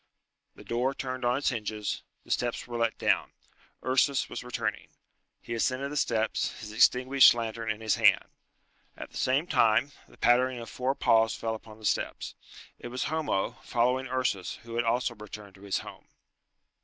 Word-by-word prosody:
The -, -, -13 dB
door 125 Hz, +3 st, -1 dB
turned 130 Hz, -1 st, -4 dB
on 120 Hz, +1 st, +2 dB
its 145 Hz, -, +1 dB
hinges, 110 Hz, -4 st, -3 dB, 0.2 s
the -, -, -9 dB
steps 120 Hz, -1 st, -1 dB
were 120 Hz, -, -7 dB
let 115 Hz, -1 st, 0 dB
down. -, -, +1 dB, 0.5 s
Ursus 130 Hz, +2 st, +2 dB
was -, -, -6 dB
returning. 125 Hz, 0 st, -3 dB, 0.5 s
He 120 Hz, -, -7 dB
ascended 130 Hz, +4 st, -1 dB
the -, -, -5 dB
steps, 110 Hz, -6 st, 0 dB
his 105 Hz, -1 st, -8 dB
extinguished 125 Hz, +4 st, +6 dB
lantern 115 Hz, -1 st, -4 dB
in 110 Hz, 0 st, -2 dB
his 110 Hz, -1 st, +1 dB
hand. -, -, +5 dB, 0.7 s
At -, -, -8 dB
the -, -, -9 dB
same 135 Hz, +5 st, +2 dB
time 125 Hz, -3 st, +3 dB, 0.2 s
the -, -, -20 dB
pattering 125 Hz, +1 st, +3 dB
of 115 Hz, -2 st, -8 dB
four 130 Hz, +2 st, -1 dB
paws 115 Hz, -3 st, +3 dB
fell 115 Hz, -1 st, -2 dB
upon 110 Hz, -1 st, -10 dB
the 110 Hz, -, -11 dB
steps. -, -, -1 dB, 0.5 s
It -, -, -7 dB
was 125 Hz, +1 st, -3 dB
Homo, 155 Hz, -12 st, -1 dB
following 125 Hz, +2 st, +1 dB
Ursus, 125 Hz, -7 st, -1 dB
who 115 Hz, -1 st, -9 dB
had 120 Hz, +1 st, 0 dB
also 120 Hz, +1 st, +1 dB
returned 105 Hz, -2 st, -10 dB
to 95 Hz, -, -18 dB
his 100 Hz, -1 st, -1 dB
home. -, -, -12 dB
120 Hz, 175 wpm, -29 LUFS, 110-130 Hz, 0.7 s, extinguished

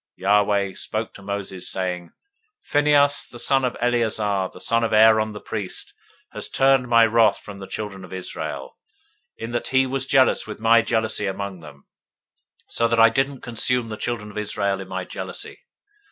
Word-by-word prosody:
025:010 -, -, -23 dB
Yahweh 100 Hz, -1 st, +2 dB
spoke 110 Hz, +1 st, -4 dB
to -, -, -12 dB
Moses, 100 Hz, -2 st, -4 dB
saying, 90 Hz, -2 st, -2 dB
025:011 -, -, -28 dB, 0.5 s
Phinehas, 145 Hz, -1 st, +3 dB
the 120 Hz, -, -12 dB
son 135 Hz, +2 st, +2 dB
of 125 Hz, -1 st, -1 dB
Eleazar, 110 Hz, -5 st, 0 dB
the -, -, -13 dB
son 115 Hz, 0 st, +1 dB
of 115 Hz, -, -1 dB
Aaron 110 Hz, 0 st, +5 dB
the 105 Hz, -, -7 dB
priest, 105 Hz, -4 st, -5 dB, 0.4 s
has -, -, -7 dB
turned 135 Hz, -1 st, +3 dB
my 115 Hz, -1 st, +6 dB
wrath 115 Hz, 0 st, +4 dB
away -, -, -17 dB
from 100 Hz, -1 st, -10 dB
the 95 Hz, -, -8 dB
children 100 Hz, -3 st, -6 dB
of -, -, -12 dB
Israel, 95 Hz, -1 st, -6 dB, 0.6 s
in 115 Hz, +1 st, -6 dB
that 120 Hz, -, -2 dB
he 130 Hz, 0 st, +3 dB
was 135 Hz, 0 st, -3 dB
jealous 135 Hz, -4 st, +3 dB
with 105 Hz, -, -7 dB
my 115 Hz, +1 st, +5 dB
jealousy 110 Hz, -2 st, 0 dB
among 95 Hz, -1 st, -4 dB
them, 75 Hz, -3 st, -14 dB, 0.8 s
so 115 Hz, -, +1 dB
that 115 Hz, 0 st, +1 dB
I 115 Hz, 0 st, +8 dB
didn't 135 Hz, +3 st, -1 dB
consume 120 Hz, 0 st, -1 dB
the 110 Hz, -, -4 dB
children 105 Hz, -2 st, -4 dB
of 105 Hz, -, -5 dB
Israel 100 Hz, -2 st, -1 dB
in 95 Hz, -, -9 dB
my 95 Hz, 0 st, -4 dB
jealousy. -, -, -7 dB
110 Hz, 185 wpm, -23 LUFS, 100-120 Hz, 0.8 s, I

